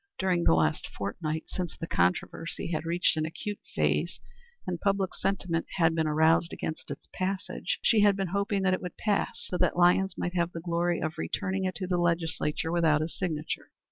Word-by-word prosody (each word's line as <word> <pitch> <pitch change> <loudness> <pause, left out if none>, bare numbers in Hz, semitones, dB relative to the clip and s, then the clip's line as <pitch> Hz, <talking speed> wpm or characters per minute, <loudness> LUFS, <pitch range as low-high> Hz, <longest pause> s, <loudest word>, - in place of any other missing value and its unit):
During 180 -2 +1
the - - +6
last 80 -1 +1
fortnight, 155 - -3
since 180 -3 -4
the - - -4
controversy 160 - -1
had 155 0 -2
reached 170 -1 +2
an 155 - +1
acute 205 +5 -5 0.2
phase - - +1 0.5
and 175 -2 -3
public 195 -2 +1
sentiment 180 -4 -1
had 165 -2 +4
been 160 -1 +1
aroused 160 +2 +3
against 160 - -5
its - - -7
passage, 190 +1 -2
she 225 - +5
had 205 -1 +5
been 195 -2 -2
hoping 200 +1 0
that 185 -1 +3
it 185 - -1
would 180 - -6
pass 210 -2 0
so 180 - -3
that - - +2
Lyons 180 +2 +4
might 175 - -2
have 175 -1 0
the 165 - -4
glory 170 0 0
of 155 +2 -3
returning 190 -1 -1
it 185 - -1
to 190 - -3
the 180 -1 0
Legislature 165 -2 0
without 160 -3 +3
his 160 +2 -3
signature. 160 -4 -3
175 Hz, 195 wpm, -29 LUFS, 160-190 Hz, 0.5 s, the